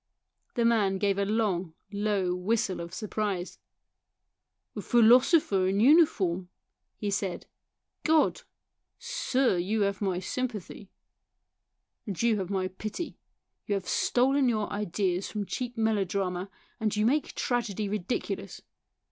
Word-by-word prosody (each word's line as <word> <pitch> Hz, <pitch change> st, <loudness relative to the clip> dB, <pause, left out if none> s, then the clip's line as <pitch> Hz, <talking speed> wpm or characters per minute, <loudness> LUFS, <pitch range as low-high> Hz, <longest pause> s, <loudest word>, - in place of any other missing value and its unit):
The 235 Hz, -2 st, +2 dB
man 210 Hz, -5 st, +3 dB
gave 200 Hz, 0 st, +1 dB
a 200 Hz, -, +1 dB
long, 195 Hz, -6 st, 0 dB, 0.2 s
low 200 Hz, -3 st, 0 dB
whistle 190 Hz, +1 st, 0 dB
of 170 Hz, 0 st, -7 dB
surprise. 205 Hz, -2 st, -3 dB, 0.6 s
" -, -, -56 dB
A -, -, -4 dB
philosopher 240 Hz, -, +5 dB
in 195 Hz, +1 st, +1 dB
uniform," 205 Hz, -, +4 dB, 0.5 s
he 205 Hz, -1 st, -2 dB
said, 195 Hz, -2 st, -2 dB, 0.3 s
" -, -, -57 dB
God! 320 Hz, -1 st, +3 dB, 0.6 s
sir, 255 Hz, -8 st, 0 dB
you 210 Hz, +5 st, 0 dB
have 200 Hz, 0 st, 0 dB
my 190 Hz, -3 st, 0 dB
sympathy." 210 Hz, -1 st, -4 dB, 0.6 s
" -, -, -56 dB
And 195 Hz, -5 st, -4 dB
you 230 Hz, -3 st, +2 dB
have 185 Hz, -2 st, -4 dB
my 190 Hz, -2 st, -1 dB
pity. 215 Hz, -, -6 dB, 0.5 s
You 205 Hz, -, +1 dB
have 195 Hz, -2 st, -4 dB
stolen 265 Hz, +1 st, +2 dB
your 215 Hz, -3 st, -1 dB
ideas 195 Hz, -2 st, -1 dB
from 210 Hz, -2 st, -3 dB
cheap 245 Hz, +3 st, -4 dB
melodrama, 195 Hz, -4 st, 0 dB, 0.3 s
and 215 Hz, -2 st, 0 dB
you 210 Hz, +1 st, +1 dB
make 280 Hz, +5 st, +1 dB
tragedy 220 Hz, -4 st, -1 dB
ridiculous. 205 Hz, +2 st, -3 dB
205 Hz, 130 wpm, -28 LUFS, 190-230 Hz, 0.6 s, philosopher